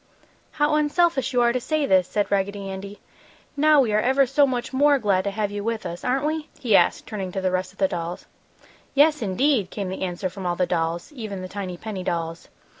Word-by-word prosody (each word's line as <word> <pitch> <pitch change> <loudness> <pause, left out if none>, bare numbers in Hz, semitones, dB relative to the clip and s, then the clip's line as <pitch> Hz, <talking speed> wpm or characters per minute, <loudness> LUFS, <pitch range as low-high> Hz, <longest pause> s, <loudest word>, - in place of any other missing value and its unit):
"How 295 0 +1
unselfish 300 -1 +2
you 250 -2 +2
are 235 0 +3
to 255 - -1
say 310 +2 0
this!" 185 -6 +3
said 205 -1 -1
Raggedy 200 0 -1
Andy. 195 +1 -7 0.6
"Now 300 0 +5
we 225 -5 0
are 210 - +4
ever 265 +4 +3
so 275 +2 +3
much 255 0 -3
more 285 +2 +4
glad 200 -6 +1
to - - +1
have 205 0 -2
you 205 0 -4
with 225 0 -2
us. 170 +1 -6
Aren't 265 +3 0
we?" 310 0 -2
he 225 -6 +2
asked, - - +3
turning 195 -4 -5
to - - -2
the 185 -1 0
rest 185 0 -1
of - - -25
the 190 - +3
dolls. 170 0 -5 0.7
"Yes, 300 +1 +4
indeed!" 220 +1 +1
came 195 -2 -4
the 190 - -6
answer 185 0 -2
from 185 0 -6
all 175 - 0
the 180 - +1
dolls, 170 - -2
even 215 -9 -6
the - - -5
tiny 185 -2 -5
penny 200 -2 -6
dolls. 165 -1 -3
205 Hz, 225 wpm, -24 LUFS, 185-270 Hz, 0.7 s, Now